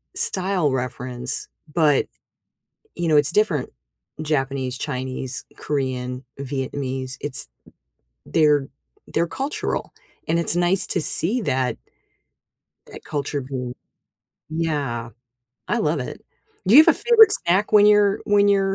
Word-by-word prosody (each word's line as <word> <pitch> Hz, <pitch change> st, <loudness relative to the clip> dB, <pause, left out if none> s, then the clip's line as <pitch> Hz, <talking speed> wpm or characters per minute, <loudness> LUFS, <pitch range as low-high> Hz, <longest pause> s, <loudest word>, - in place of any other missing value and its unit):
style 185 Hz, -6 st, +2 dB
reference, 125 Hz, -1 st, -3 dB, 0.3 s
but, 155 Hz, -4 st, +3 dB, 0.9 s
you 175 Hz, -, -2 dB
know, 155 Hz, -, +4 dB
it's 145 Hz, +1 st, +4 dB
different 170 Hz, -10 st, +1 dB, 0.5 s
Japanese, 135 Hz, -4 st, -2 dB
Chinese, 130 Hz, 0 st, -4 dB
Korean, 130 Hz, -2 st, -3 dB, 0.2 s
Vietnamese, 135 Hz, -1 st, -4 dB
it's 135 Hz, -2 st, -2 dB, 0.8 s
they're 150 Hz, -3 st, +2 dB, 0.4 s
they're 170 Hz, +1 st, 0 dB
cultural, 275 Hz, -, -3 dB, 0.3 s
and 170 Hz, +1 st, +1 dB
it's 170 Hz, -, +3 dB
nice 175 Hz, +2 st, +2 dB
to 175 Hz, -, -1 dB
see 220 Hz, +11 st, +2 dB
that 130 Hz, -8 st, -1 dB, 1.1 s
that -, -, -12 dB
culture 145 Hz, -1 st, -3 dB
being 125 Hz, -2 st, -5 dB, 0.8 s
yeah, 140 Hz, -8 st, -2 dB, 0.6 s
I -, -, +1 dB
love -, -, 0 dB
it. -, -, -7 dB, 0.4 s
Do 220 Hz, -, +5 dB
you -, -, +12 dB
have -, -, +1 dB
a -, -, +8 dB
favorite 445 Hz, -3 st, +6 dB
snack 195 Hz, -, +1 dB
when 210 Hz, 0 st, +7 dB
you're 205 Hz, -1 st, +4 dB
when 205 Hz, 0 st, +3 dB
you're 195 Hz, -1 st, +2 dB
150 Hz, 120 wpm, -22 LUFS, 130-190 Hz, 1.1 s, you